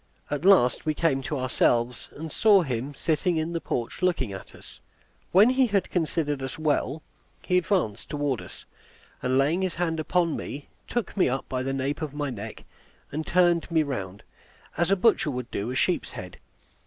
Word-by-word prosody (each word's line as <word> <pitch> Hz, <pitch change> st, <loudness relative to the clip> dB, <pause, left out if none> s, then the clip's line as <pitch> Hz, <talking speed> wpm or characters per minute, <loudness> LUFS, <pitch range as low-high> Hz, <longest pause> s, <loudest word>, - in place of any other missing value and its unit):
At 145 Hz, +3 st, -2 dB
last 190 Hz, -11 st, +5 dB
we 155 Hz, -1 st, 0 dB
came 145 Hz, -5 st, +1 dB
to 145 Hz, +2 st, -3 dB
ourselves, 125 Hz, -2 st, +1 dB
and 160 Hz, +1 st, -6 dB
saw 205 Hz, -4 st, +5 dB
him 130 Hz, -1 st, -3 dB
sitting 165 Hz, +3 st, 0 dB
in 160 Hz, +2 st, -1 dB
the 165 Hz, -, -2 dB
porch 120 Hz, +9 st, -3 dB
looking 170 Hz, -, +1 dB
at 95 Hz, -, -10 dB
us. -, -, -14 dB, 0.5 s
When 205 Hz, +7 st, +7 dB
he 260 Hz, 0 st, +3 dB
had 200 Hz, -3 st, 0 dB
considered 155 Hz, -4 st, -1 dB
us 135 Hz, -1 st, -5 dB
well, 155 Hz, 0 st, 0 dB, 0.4 s
he 180 Hz, 0 st, +3 dB
advanced 170 Hz, -, -1 dB
toward 145 Hz, -5 st, -1 dB
us, -, -, -12 dB, 0.6 s
and 130 Hz, +1 st, +1 dB
laying 150 Hz, +7 st, +2 dB
his 185 Hz, -2 st, -1 dB
hand 165 Hz, -2 st, -1 dB
upon 170 Hz, +1 st, +1 dB
me, 140 Hz, 0 st, -6 dB, 0.2 s
took 240 Hz, -4 st, -3 dB
me 190 Hz, -, +3 dB
up 135 Hz, +2 st, -3 dB
by 130 Hz, -1 st, -2 dB
the 135 Hz, +1 st, -2 dB
nape 135 Hz, +3 st, -2 dB
of 150 Hz, -2 st, -4 dB
my 145 Hz, -2 st, -2 dB
neck, 110 Hz, -1 st, -7 dB, 0.5 s
and 155 Hz, +2 st, -4 dB
turned 175 Hz, -2 st, +3 dB
me 160 Hz, -2 st, +3 dB
round, 100 Hz, -9 st, -5 dB, 0.5 s
as 170 Hz, +1 st, +1 dB
a 195 Hz, -, +5 dB
butcher 195 Hz, -5 st, +3 dB
would 125 Hz, -2 st, -5 dB
do 105 Hz, +4 st, -3 dB
a 130 Hz, -, -3 dB
sheep's -, -, 0 dB
head. -, -, -8 dB
150 Hz, 190 wpm, -26 LUFS, 130-175 Hz, 0.6 s, When